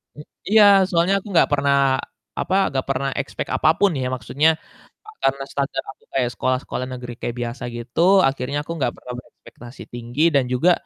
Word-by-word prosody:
Hmm, 150 Hz, -, -12 dB, 0.2 s
iya 215 Hz, 0 st, +7 dB, 0.3 s
soalnya 175 Hz, +1 st, +2 dB
aku 195 Hz, -, -14 dB
nggak 170 Hz, -, +4 dB
pernah 140 Hz, -1 st, +2 dB, 0.6 s
apa, 190 Hz, -, 0 dB, 0.2 s
nggak 135 Hz, -1 st, -2 dB
pernah 135 Hz, 0 st, 0 dB
expect 140 Hz, -, -6 dB
apapun 180 Hz, +5 st, +3 dB
ya, 130 Hz, -, -1 dB
maksudnya 135 Hz, +7 st, +1 dB, 0.6 s
a -, -, -9 dB
karena 135 Hz, 0 st, +1 dB
standar 135 Hz, -1 st, -2 dB
aku -, -, -23 dB
kayak 125 Hz, -3 st, +1 dB
sekolah-sekolah 130 Hz, 0 st, -2 dB
negeri 125 Hz, -1 st, -7 dB
kayak 120 Hz, -, -3 dB
biasa 120 Hz, +1 st, -5 dB
gitu, 120 Hz, +6 st, -3 dB, 0.3 s
akhirnya 135 Hz, +1 st, -2 dB
aku -, -, -6 dB
nggak 125 Hz, -3 st, 0 dB
pernah 125 Hz, -, -8 dB
berekspektasi 125 Hz, 0 st, -14 dB
tinggi 120 Hz, +5 st, -2 dB
dan 140 Hz, -, +4 dB
juga, 165 Hz, +9 st, +4 dB
135 Hz, 170 wpm, -21 LUFS, 125-150 Hz, 0.6 s, iya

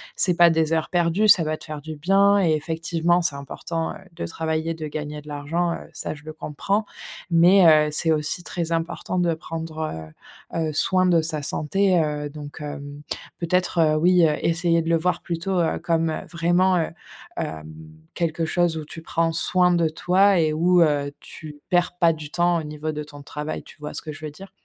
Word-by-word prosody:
c'est 180 Hz, -2 st, +2 dB
pas 170 Hz, 0 st, +7 dB
des 160 Hz, -1 st, +1 dB
heures 160 Hz, -1 st, 0 dB
perdues, 175 Hz, +4 st, +2 dB
ça 180 Hz, -, +7 dB
va 155 Hz, 0 st, -2 dB
te -, -, -14 dB
faire 155 Hz, -2 st, -7 dB
du 155 Hz, +1 st, -7 dB
bien 195 Hz, +5 st, +4 dB
et 165 Hz, -3 st, +3 dB
effectivement 165 Hz, +2 st, 0 dB
c'est 160 Hz, -4 st, -1 dB
important, 160 Hz, +4 st, -4 dB
heu, -, -, -10 dB, 0.2 s
de 125 Hz, -, -5 dB
travailler, 160 Hz, -, -2 dB
de 160 Hz, -1 st, -6 dB
gagner 150 Hz, 0 st, -5 dB
de 150 Hz, -, -18 dB
l'argent, 165 Hz, +4 st, -1 dB
heu, -, -, -9 dB
ça, -, -, -4 dB
je 150 Hz, -, -15 dB
le 155 Hz, -, -7 dB
comprends 195 Hz, +8 st, -2 dB, 0.5 s
mais, 175 Hz, +3 st, +6 dB, 0.2 s
heu, -, -, -2 dB
c'est 160 Hz, +2 st, +1 dB
aussi 155 Hz, +3 st, -1 dB
très 170 Hz, -2 st, -4 dB
important 165 Hz, +2 st, -2 dB
de 175 Hz, -1 st, +2 dB
prendre, 160 Hz, -, -6 dB, 0.5 s
heu -, -, 0 dB
heu, -, -, -5 dB
soin 185 Hz, +4 st, +2 dB
de 175 Hz, -2 st, +4 dB
sa 155 Hz, -2 st, -3 dB
santé, 185 Hz, +6 st, +1 dB
heu, 150 Hz, -1 st, -3 dB
donc 145 Hz, 0 st, -10 dB
hem, 145 Hz, 0 st, -7 dB, 0.4 s
peut-être, 180 Hz, +1 st, 0 dB
heu, 155 Hz, -2 st, +4 dB
oui, 175 Hz, +2 st, +4 dB
heu, 150 Hz, -1 st, +2 dB
essayer 165 Hz, 0 st, +2 dB
de 165 Hz, -, -4 dB
le 165 Hz, -, +4 dB
voir 180 Hz, +3 st, -1 dB
plutôt, 180 Hz, +2 st, -2 dB
heu, 165 Hz, -, 0 dB
comme, 165 Hz, -1 st, 0 dB
heu, -, -, -4 dB
vraiment, 175 Hz, +2 st, +2 dB
heu, 165 Hz, -, 0 dB, 0.5 s
hem, 80 Hz, 0 st, -5 dB, 0.4 s
quelque 165 Hz, -1 st, -1 dB
chose 175 Hz, 0 st, +1 dB
où 155 Hz, -, -4 dB
tu 165 Hz, -, -9 dB
prends 165 Hz, 0 st, 0 dB
soin 180 Hz, +2 st, +3 dB
de 170 Hz, -2 st, +2 dB
toi 185 Hz, +4 st, +3 dB
et 155 Hz, -2 st, +2 dB
où, 175 Hz, +3 st, +3 dB
heu, 145 Hz, -3 st, +2 dB
tu 150 Hz, -1 st, -11 dB
perds 175 Hz, 0 st, +1 dB
pas 170 Hz, -2 st, +4 dB
du 155 Hz, -2 st, -9 dB
temps 175 Hz, 0 st, +2 dB
au -, -, -5 dB
niveau 150 Hz, +1 st, -4 dB
de 150 Hz, 0 st, -4 dB
ton 145 Hz, -1 st, -12 dB
travail, 150 Hz, +2 st, -5 dB
tu -, -, -16 dB
vois 150 Hz, 0 st, -6 dB
ce -, -, -4 dB
que 155 Hz, -, -7 dB
je 155 Hz, +1 st, -9 dB
veux 150 Hz, -, -5 dB
dire? 190 Hz, +6 st, -12 dB
165 Hz, 210 wpm, -23 LUFS, 155-175 Hz, 0.5 s, pas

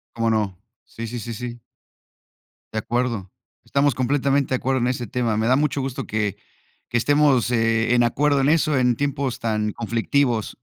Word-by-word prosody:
Como 115 Hz, -1 st, +1 dB
no. 105 Hz, -5 st, 0 dB, 0.3 s
Sí, 115 Hz, 0 st, -7 dB
sí, 120 Hz, +1 st, -5 dB
sí, 115 Hz, +1 st, -6 dB
sí. 120 Hz, +1 st, -6 dB, 1.1 s
De 110 Hz, -, 0 dB
acuerdo. 115 Hz, -4 st, -2 dB, 0.4 s
Estamos 140 Hz, 0 st, +2 dB
completamente 140 Hz, +1 st, +1 dB
de 130 Hz, -, +1 dB
acuerdo 130 Hz, +1 st, 0 dB
en 125 Hz, -, +1 dB
ese 125 Hz, -1 st, -2 dB
tema. 115 Hz, -1 st, -1 dB
Me 110 Hz, +1 st, +1 dB
da 130 Hz, -, +4 dB
mucho 145 Hz, 0 st, 0 dB
gusto 130 Hz, -1 st, -4 dB
que 105 Hz, -2 st, -1 dB, 0.5 s
que 120 Hz, -, +1 dB
estemos, 145 Hz, -3 st, +3 dB
eh, 115 Hz, 0 st, +2 dB
en 120 Hz, -, +4 dB
acuerdo 140 Hz, +4 st, +2 dB
en 135 Hz, -, +3 dB
eso, 155 Hz, -2 st, +2 dB
en 125 Hz, -2 st, +2 dB
tiempos 140 Hz, -2 st, -2 dB
tan 105 Hz, -2 st, -1 dB
conflictivos, 115 Hz, 0 st, 0 dB
120 Hz, 175 wpm, -22 LUFS, 115-135 Hz, 1.1 s, da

